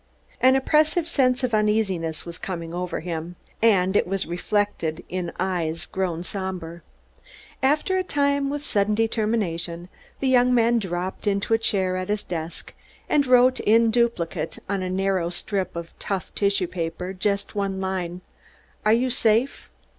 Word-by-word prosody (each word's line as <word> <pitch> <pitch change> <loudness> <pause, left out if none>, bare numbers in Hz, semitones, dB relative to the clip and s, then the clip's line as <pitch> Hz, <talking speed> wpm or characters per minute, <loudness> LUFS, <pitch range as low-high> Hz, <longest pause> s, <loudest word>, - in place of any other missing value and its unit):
An 260 +1 +6
oppressive 310 +5 +2
sense 260 -5 +2
of 245 -2 0
uneasiness 210 -7 +1
was 170 -1 -7
coming 170 -3 -5
over 180 -2 -3
him; 170 0 -5 0.3
and 195 -4 +4
it - - +3
was 195 +1 -1
reflected 175 -2 -1
in 180 -2 -3
eyes 175 -3 -1
grown 175 -3 -2
somber. 180 -3 -5 0.8
After 300 +8 +2
a - - 0
time, 280 -3 +1
with 290 +1 -4
sudden 210 -2 +1
determination, 205 -6 -1 0.3
the 270 - 0
young 250 -1 +4
man 235 0 +4
dropped 185 0 -4
into 200 +2 +1
a 225 - +4
chair 190 -4 0
at 185 +1 -4
his 210 0 -1
desk, 165 -1 -6 0.3
and 285 -2 +2
wrote 250 0 +5
in 225 +1 +4
duplicate, 230 -10 0
on 195 -1 -1
a 185 - -2
narrow 190 -2 0
strip 185 0 -3
of 170 -1 -6
tough 195 -4 -3
tissue 200 -2 +1
paper, 175 +1 -4
just 200 +1 -1
one 195 -2 -2
line: 185 -2 -3 0.6
Are 215 - +4
you 250 +2 +2
safe? 235 +2 +1
195 Hz, 155 wpm, -24 LUFS, 180-230 Hz, 0.8 s, An